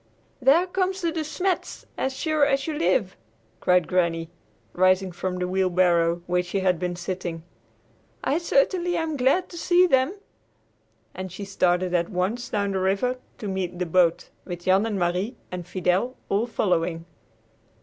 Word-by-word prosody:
"There 285 +8 +5
come 370 +1 0
the 350 -3 -2
De 325 - -3
Smets, 360 +4 -2
as 265 0 -2
sure 310 -2 +1
as 275 -1 +2
you 320 - -2
live!" 250 - +1 0.4
cried 180 0 +3
Granny, 170 -2 0 0.4
rising 185 +1 +3
from 180 +1 -3
the 180 0 -1
wheelbarrow, 175 -2 +2
where 180 0 +1
she 180 +2 -3
had 180 -3 +2
been 180 0 -2
sitting. 175 -2 -5 0.8
"I 300 - +1
certainly 350 +2 +1
am 320 -2 -1
glad 275 +8 +2
to 340 - -9
see 355 +1 +4
them." 265 +2 +2 1.0
And 185 -1 -6
she 200 +3 -7
started 180 -2 +1
at 170 -1 +1
once 215 +6 -2
down 200 -1 -1
the 190 - -1
river 200 +7 0 0.2
to 210 - -6
meet 190 -2 -3
the 180 - -1
boat, 170 0 +2
with 175 -1 -7
Jan 190 +4 +3
and 210 -3 -2
Marie 180 +6 -1 0.2
and 180 -2 -6
Fidel 185 +7 0
all 210 +4 +1
following. 170 -6 0
190 Hz, 160 wpm, -25 LUFS, 180-265 Hz, 1.0 s, There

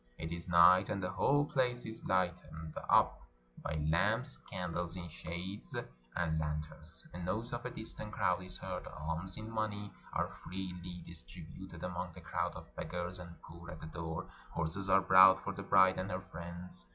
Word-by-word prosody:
It 80 0 -4
is 85 +1 -4
night; 90 +2 +8
and 100 -2 -1
the 90 - 0
whole 145 +1 +4
place 125 -4 +1
is 110 0 -7
lighted 90 -1 +1 0.4
up - - +5 0.4
by 75 - -2
lamps, 105 - +2
candles 90 -2 -2
in 85 -1 -5
shades, 85 +5 -6 0.4
and 80 -2 +1
lanterns. 75 +1 -4
A 90 - -5
noise 110 +8 -2
of 120 0 -3
a - - -1
distant 110 -2 -4
crowd 90 -3 +2
is 90 0 -6
heard; - - -4
alms 80 +5 -4
in 110 - -6
money 110 -2 -2 0.2
are - - 0
freely 90 -1 -5
distributed 85 +1 -9
among 90 -1 -3
the - - -11
crowd - - -1
of - - -10
beggars 90 +1 -3
and 85 -1 -9
poor 85 +1 -10
at 80 - -7
the - - -7
door; 80 0 -4 0.2
horses 95 +5 -2
are 95 +1 +7
brought 95 0 +8
for 100 - -2
the 100 - -5
bride 95 -1 +6
and 95 +1 -2
her 90 0 -2
friends. 85 -2 -6
90 Hz, 175 wpm, -35 LUFS, 85-95 Hz, 0.4 s, night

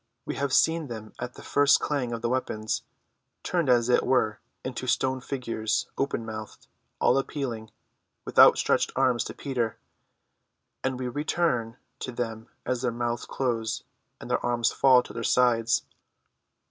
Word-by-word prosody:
We - - -3
have 140 -1 -2
seen 160 +3 +3
them 110 -3 -8
at 125 +1 -5
the - - -11
first 145 0 +4
clang 135 -5 -1
of 115 0 -4
the 115 - +1
weapons, 110 -4 -1 0.6
turned 170 -6 0
as 120 -1 +4
it 125 - +4
were 110 -5 +1 0.3
into 130 0 -4
stone 130 +1 +1
figures, 115 -5 -2
open 135 -4 -1
mouthed, 110 -1 -8 0.3
all 135 - +4
appealing 125 -6 -4 0.6
with - - -1
outstretched - - +6
arms 125 -3 +2
to - - -7
Peter; 120 -6 -2 1.1
and 130 -1 -1
we 130 0 -3
return 125 -3 -1 0.2
to 130 - -4
them 115 -2 -4 0.2
as 125 -1 -1
their 125 -2 0
mouths 120 0 -3
close, 115 -4 -2 0.4
and - - -7
their - - +1
arms 120 -1 +1
fall 130 -2 +5
to - - -11
their 115 - -4
sides. 115 -1 +3
125 Hz, 155 wpm, -27 LUFS, 115-130 Hz, 1.1 s, outstretched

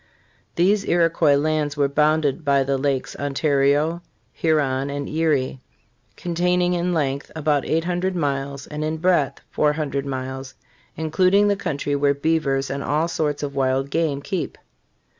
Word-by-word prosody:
These 195 +4 +3
Iroquois 165 -3 +3
lands 150 0 0
were 140 -1 +3
bounded 150 +1 +1
by 140 -2 +3
the 135 +1 0
Lakes 135 -1 -1
Ontario, 145 +3 +1 0.3
Huron 140 -4 +1
and 140 0 -4
Erie, 150 -5 0 0.5
"containing 180 +1 +1
in 175 0 0
length 140 -4 -1
about 150 -3 +1
800 175 +3 0
miles 140 -3 -2
and 150 0 -5
in 155 +1 -2
breadth 165 -5 +1
400 150 -2 0
miles, 130 -1 -5 0.4
including 185 +6 +3
the 200 - +2
country 145 -6 -2
where 140 0 +2
beavers 140 -3 0
and 140 +1 -3
all 155 +3 +1
sorts 150 -3 -2
of 140 -1 -3
wild 135 0 0
game 150 -4 0
keep." 190 0 -3
150 Hz, 140 wpm, -22 LUFS, 140-165 Hz, 0.5 s, These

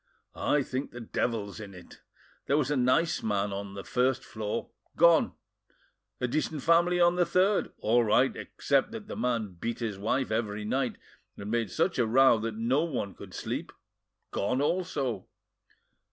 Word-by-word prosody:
"I 145 -1 +1
think 130 +2 -4
the 120 - -9
devil's 110 -2 -2
in 100 -3 -9
it. 90 - -14 0.5
There 140 - +3
was 150 -1 +1
a - - +2
nice 130 +6 +2
man 100 -2 -1
on 100 0 -6
the 100 - -6
first 130 +1 +1
floor 110 -4 -4 0.2
gone; 170 0 +5 0.9
a 125 - 0
decent 150 +2 -2
family 170 +1 +4
on 175 0 +4
the 180 - +5
third, 185 +4 +2
all 120 +2 +3
right 120 +5 +3
except 140 - 0
that 220 -2 -7
the - - -6
man 115 -7 -2
beat 115 +3 -2
his 110 -5 -4
wife 120 +4 0
every 105 -2 -2
night, 130 +3 0 0.4
and 100 +1 -6
made 115 -3 0
such 170 - 0
a 120 - +3
row 130 0 +5
that 110 0 -3
no 120 +7 +1
one 125 - -3
could - - -11
sleep—gone 125 +6 -5
also. 145 - -1
125 Hz, 165 wpm, -29 LUFS, 110-150 Hz, 0.9 s, gone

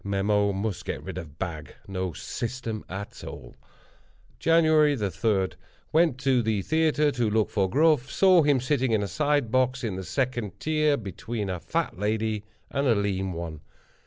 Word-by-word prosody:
Mem—must 100 0 0
get - - -4
rid - - -5
of 80 -4 -10
Bag—no 90 +2 -5
system 115 - -4
at 100 +6 -7
all. - - -9 0.8
"Jan. 165 +1 +4
3.—Went 140 - +1
to 135 -2 +2
the 110 -3 0
theatre, 155 - +2
to 120 -4 0
look 110 0 +1
for 95 -3 +1
Gruff. 150 - +3
Saw 185 -3 +5
him 145 -3 +3
sitting 130 -1 +1
in 105 -2 +2
a - - -2
side 145 - 0
box, 130 0 +1
in 105 -5 -2
the 95 - -4
second 120 -4 -2
tier, 155 -2 +2
between 105 -1 -4
a 90 - -3
fat 90 - -2
lady 110 0 -1 0.3
and 140 +1 0
a 115 - +4
lean 95 -2 -1
one. 85 -2 -6
110 Hz, 155 wpm, -26 LUFS, 100-140 Hz, 0.8 s, Saw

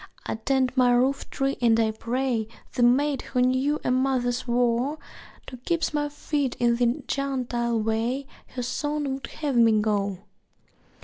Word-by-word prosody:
(I - - -2
tend 260 +3 0
my 250 -2 +4
roof 260 +3 +1
tree 275 0 -1
and 230 -1 +4
I 220 -1 +2
pray 235 0 -1 0.3
The - - -1
Maid 265 +3 +3
who 250 - -1
knew 260 +4 +1
a - - 0
mother's 255 -1 0
woe 245 +4 +1 0.5
To 255 - -9
keep 330 +6 -1
my 295 0 0
feet 290 -2 -2
in 235 -1 +3
the 240 0 +1
gentile 245 -4 -1
way 225 +5 -1 0.2
Her 250 - -5
Son 295 +4 -2
would 270 - -6
have 290 -4 -3
me 225 -2 +5
go.) 205 -2 0
250 Hz, 160 wpm, -25 LUFS, 235-275 Hz, 0.5 s, me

